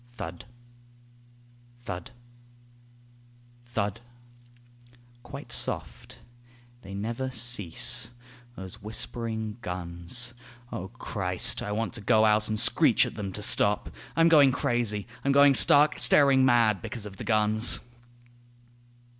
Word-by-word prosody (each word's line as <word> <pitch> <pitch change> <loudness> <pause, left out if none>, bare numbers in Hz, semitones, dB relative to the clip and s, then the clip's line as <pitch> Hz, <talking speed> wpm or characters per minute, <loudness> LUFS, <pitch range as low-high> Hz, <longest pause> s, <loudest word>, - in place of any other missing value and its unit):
Thud, 120 -1 -9 1.4
thud, 90 -6 -8 1.6
thud, 110 -2 -4 1.2
quite - - -11
soft... - - -3 0.6
they 100 -2 -11
never 115 +6 -5
cease 115 -4 0 0.5
Those 95 -3 -11
whispering 110 +1 -6
guns 90 +6 -3 0.4
O 95 - -7
Christ, 95 -5 -1
I 105 - -6
want 115 +2 -4
to 115 - -4
go 110 +2 +2
out 105 0 +1
And 110 -1 -1
screech - - +3
at - - -8
them 100 -2 -7
to 105 - -5
stop 105 0 +2 0.2
I'm 165 0 +3
going 145 -5 +4
crazy; 120 -6 -2 0.2
I'm 140 - 0
going 140 0 +5
stark, 145 +3 +5
staring 140 -2 +5
mad 115 -6 +1
because 110 +3 -6
of 100 -2 -11
the - - -8
guns. 110 +1 +4
110 Hz, 115 wpm, -25 LUFS, 100-120 Hz, 1.6 s, going